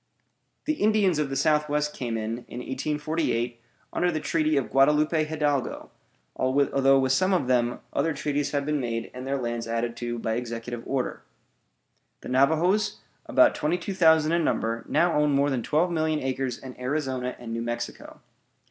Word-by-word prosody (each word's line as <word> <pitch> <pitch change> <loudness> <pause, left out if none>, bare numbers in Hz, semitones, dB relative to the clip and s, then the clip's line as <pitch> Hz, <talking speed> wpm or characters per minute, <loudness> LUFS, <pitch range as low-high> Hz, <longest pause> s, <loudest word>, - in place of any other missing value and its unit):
The 310 0 -1
Indians 205 -6 +3
of 150 -2 0
the 135 - -3
Southwest 150 +1 +1
came 120 -3 -3
in, 110 +2 -3
in - - -9
1848, 130 -3 -2 0.3
under 175 0 +1
the 155 - -2
treaty 155 -1 +1
of 120 -6 -1
Guadalupe 150 +3 +3
Hidalgo, 150 -4 -2 0.4
although 135 +1 +3
with 130 -1 +2
some 185 +8 +3
of 170 - 0
them 120 -1 +1
other 160 +4 +1
treaties 145 -1 -1
have 145 -1 -1
been 150 0 0
made 115 -3 -3
and 130 +1 -7
their 140 +1 0
lands 120 -2 -3
added 115 +1 -2
to 120 0 -3
by 115 -1 -2
executive 120 0 -5
order. 135 -2 -2 1.0
The - - -8
Navajoes, 165 +11 +2 0.3
about 315 -1 +5
twenty 155 +4 0
two 185 +2 -5
thousand 160 -3 +4
in 170 0 +2
number, 115 -5 -1
now 175 -1 +3
own 150 -1 +2
more 140 +1 +2
than 130 -3 0
twelve 160 +9 +1
million 155 -2 0
acres 130 -2 -2
in 130 -2 -11
Arizona 130 -1 -2
and 115 -2 -7
New 115 - -2
Mexico. 120 0 -5
140 Hz, 170 wpm, -26 LUFS, 125-155 Hz, 1.0 s, about